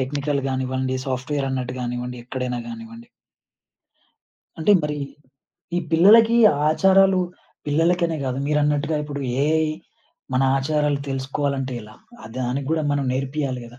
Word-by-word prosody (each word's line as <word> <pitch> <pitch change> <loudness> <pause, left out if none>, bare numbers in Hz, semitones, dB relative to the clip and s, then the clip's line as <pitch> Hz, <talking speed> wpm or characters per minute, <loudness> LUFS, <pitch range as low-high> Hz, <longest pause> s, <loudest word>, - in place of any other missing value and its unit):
Technical 140 +2 -1
గానివ్వండి, 130 0 -1
సాఫ్ట్‌వేరన్నట్టు 130 -1 -2
గానివ్వండి, 125 0 -4
ఎక్కడైనా 125 -1 -3
గానివ్వండి. 115 0 -10 1.5
అంటే 160 +6 +4
మరి 150 0 -2 0.8
ఈ - - +3
పిల్లలకి 220 +7 +6 0.3
ఆచారాలు 190 +3 +4 0.5
పిల్లలకనే 165 +3 +1
గాదు. 130 0 -2
మీరన్నట్టుగా 150 +1 +1
ఇప్పుడు 145 -1 -5 0.2
ఏఐ 160 +1 +2 0.7
మన 130 - +3 0.2
ఆచారాలు 150 0 0
తెలుసుకోవాలంటే 135 0 -2
ఎలా? 105 0 -13 0.3
ఆ - - -11
దానిగ్గూడా 135 +5 -1
మనం 145 -1 0
నేర్పియాలి 135 -1 -2
గదా! 120 +1 -15
140 Hz, 110 wpm, -22 LUFS, 130-155 Hz, 1.5 s, పిల్లలకి